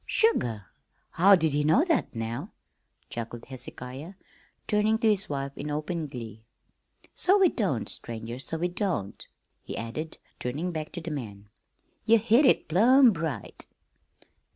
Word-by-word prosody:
"Sugar! 120 Hz, -, +1 dB, 0.5 s
How'd 185 Hz, -1 st, +5 dB
he 150 Hz, -2 st, +2 dB
know 160 Hz, -, +4 dB
that, 330 Hz, -, 0 dB
now?" 115 Hz, -, -4 dB, 0.6 s
chuckled 115 Hz, 0 st, -6 dB
Hezekiah, 130 Hz, +5 st, -8 dB, 0.5 s
turning 215 Hz, +1 st, +2 dB
to 225 Hz, 0 st, +1 dB
his 210 Hz, -1 st, +2 dB
wife 140 Hz, -1 st, -3 dB
in 150 Hz, -, -5 dB
open 155 Hz, +2 st, -3 dB
glee. 115 Hz, -5 st, -9 dB, 0.7 s
"So 385 Hz, +3 st, +3 dB
we 380 Hz, -3 st, +5 dB
don't, 180 Hz, -, -1 dB
stranger, 115 Hz, +1 st, -5 dB
so 160 Hz, +4 st, -3 dB
we 175 Hz, +2 st, 0 dB
don't," 175 Hz, -, -3 dB, 0.3 s
he -, -, -7 dB
added, 150 Hz, +8 st, -5 dB, 0.2 s
turning 150 Hz, +9 st, -3 dB
back 155 Hz, -2 st, -5 dB
to 175 Hz, -, -5 dB
the 165 Hz, 0 st, -6 dB
man. 105 Hz, -8 st, -7 dB, 0.5 s
"Ye 230 Hz, +1 st, +5 dB
hit 235 Hz, +6 st, +4 dB
it -, -, +3 dB
plumb 235 Hz, -, +6 dB
right." 150 Hz, -, -5 dB
155 Hz, 140 wpm, -27 LUFS, 125-205 Hz, 0.7 s, plumb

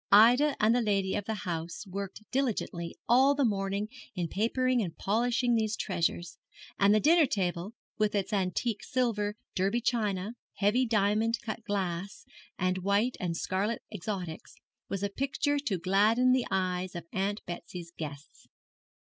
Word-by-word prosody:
Ida 245 Hz, +8 st, +7 dB
and 215 Hz, +2 st, +4 dB
the 245 Hz, -, +3 dB
lady 195 Hz, -3 st, +1 dB
of 205 Hz, -, -2 dB
the 220 Hz, -, -2 dB
house 170 Hz, +2 st, -4 dB
worked 195 Hz, +2 st, -6 dB
diligently 220 Hz, -10 st, -2 dB
all 265 Hz, +4 st, +5 dB
the 280 Hz, -2 st, +2 dB
morning 200 Hz, -1 st, -1 dB, 0.3 s
in 175 Hz, -3 st, -2 dB
papering 250 Hz, +4 st, +1 dB
and 165 Hz, -6 st, -4 dB
polishing 240 Hz, +3 st, +1 dB
these 220 Hz, -1 st, +1 dB
treasures; 175 Hz, -3 st, -2 dB, 0.4 s
and 200 Hz, +1 st, +5 dB
the 215 Hz, -, +5 dB
dinner 315 Hz, +4 st, +5 dB
table, 185 Hz, 0 st, -2 dB, 0.2 s
with 215 Hz, -1 st, +2 dB
its 200 Hz, +2 st, -1 dB
antique 200 Hz, +3 st, -1 dB
silver, 215 Hz, -5 st, 0 dB, 0.2 s
Derby 195 Hz, +5 st, +1 dB
china, 215 Hz, -4 st, -1 dB, 0.2 s
heavy 220 Hz, +6 st, +2 dB
diamond 215 Hz, +1 st, +2 dB
cut 225 Hz, 0 st, -5 dB
glass, 195 Hz, -2 st, -3 dB, 0.3 s
and 185 Hz, +1 st, 0 dB
white 200 Hz, +6 st, +1 dB
and 170 Hz, -2 st, -2 dB
scarlet 205 Hz, +7 st, -1 dB
exotics, 185 Hz, -4 st, -5 dB, 0.3 s
was 195 Hz, 0 st, -3 dB
a 200 Hz, -, +1 dB
picture 280 Hz, +5 st, 0 dB
to 230 Hz, -10 st, -1 dB
gladden 210 Hz, +8 st, +3 dB
the 255 Hz, -1 st, +2 dB
eyes 185 Hz, -1 st, -1 dB
of 170 Hz, -1 st, -5 dB
Aunt 200 Hz, +2 st, -1 dB
Betsy's 175 Hz, 0 st, -7 dB
guests. 145 Hz, -2 st, -8 dB
205 Hz, 150 wpm, -30 LUFS, 185-235 Hz, 0.4 s, Ida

